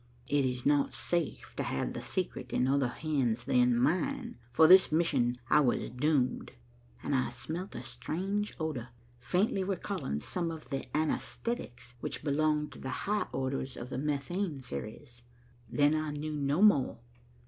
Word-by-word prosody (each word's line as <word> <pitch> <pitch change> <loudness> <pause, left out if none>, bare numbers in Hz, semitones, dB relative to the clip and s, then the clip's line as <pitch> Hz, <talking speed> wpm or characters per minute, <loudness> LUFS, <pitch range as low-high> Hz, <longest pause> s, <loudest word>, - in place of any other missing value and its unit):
'It 145 -1 +2
is 125 -1 -2
not 140 -2 +3
safe 170 +4 -2
to - - -2
have 65 - -2
the - - -5
secret - - -3
in 125 - +2
other 135 -1 +3
hands 125 -4 -1
than 125 -1 +3
mine. 235 - 0 0.2
For 160 +6 +6
this 185 +1 +8
mission 140 -7 +2
was 140 -5 +4
I - - -4
doomed,' 130 +1 0 0.5
and - - -1
I 130 -1 +2
smelt 155 +10 -5
a - - -5
strange 195 +5 -3
odor, 150 -7 -3 0.3
faintly 190 - +1
recalling 185 - -2
some 170 - -2
of 160 -2 -8
the 135 - -3
anaesthetics 155 - -3
which - - -4
belong 150 +1 +1
to - - -11
the 130 - -5 0.2
higher 210 +1 0
orders 130 0 -2
of 125 +2 -7
the 125 - -2
methane 150 +2 -2
series. 120 - -7 0.5
Then 145 +1 +3
I 155 0 0
knew 150 +1 -4
no 145 +5 +1
more. 150 -12 +5
145 Hz, 160 wpm, -31 LUFS, 125-165 Hz, 0.5 s, this